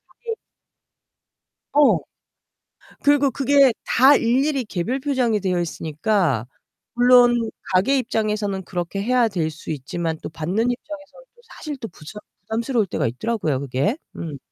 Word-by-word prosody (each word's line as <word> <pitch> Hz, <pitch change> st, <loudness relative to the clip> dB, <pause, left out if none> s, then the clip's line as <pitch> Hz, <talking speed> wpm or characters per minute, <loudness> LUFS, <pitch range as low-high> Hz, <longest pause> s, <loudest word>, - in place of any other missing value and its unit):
그게 460 Hz, -2 st, -5 dB, 1.4 s
어. 295 Hz, -1 st, +5 dB, 1.0 s
그리고 285 Hz, -1 st, +4 dB
그게 275 Hz, -1 st, +4 dB
다 270 Hz, +4 st, +5 dB
일일이 265 Hz, +3 st, +1 dB
개별 215 Hz, +7 st, -3 dB
표장이 255 Hz, -6 st, 0 dB
되어 185 Hz, -2 st, 0 dB
있으니까 160 Hz, -, -1 dB, 0.5 s
물론 245 Hz, -2 st, +5 dB, 0.2 s
가게 195 Hz, +10 st, +3 dB
입장에서는 210 Hz, -5 st, -1 dB
그렇게 175 Hz, +2 st, -4 dB
해야 245 Hz, +1 st, +2 dB
될 170 Hz, -6 st, -2 dB
수 155 Hz, +1 st, -10 dB
있지만 160 Hz, +3 st, -3 dB
또 -, -, -5 dB
받는 180 Hz, +10 st, -1 dB
입장에서는 295 Hz, -, -8 dB
또 480 Hz, -, -23 dB
사실 300 Hz, -3 st, -6 dB
또 225 Hz, -, -6 dB
무척 210 Hz, +9 st, -11 dB, 0.2 s
부담스러울 225 Hz, +1 st, -1 dB
때가 185 Hz, -, -1 dB
있더라고요, 155 Hz, -, -1 dB
그게. 140 Hz, -, -1 dB, 0.2 s
음. 160 Hz, -4 st, -6 dB
220 Hz, 295 characters per minute, -22 LUFS, 175-260 Hz, 1.4 s, 어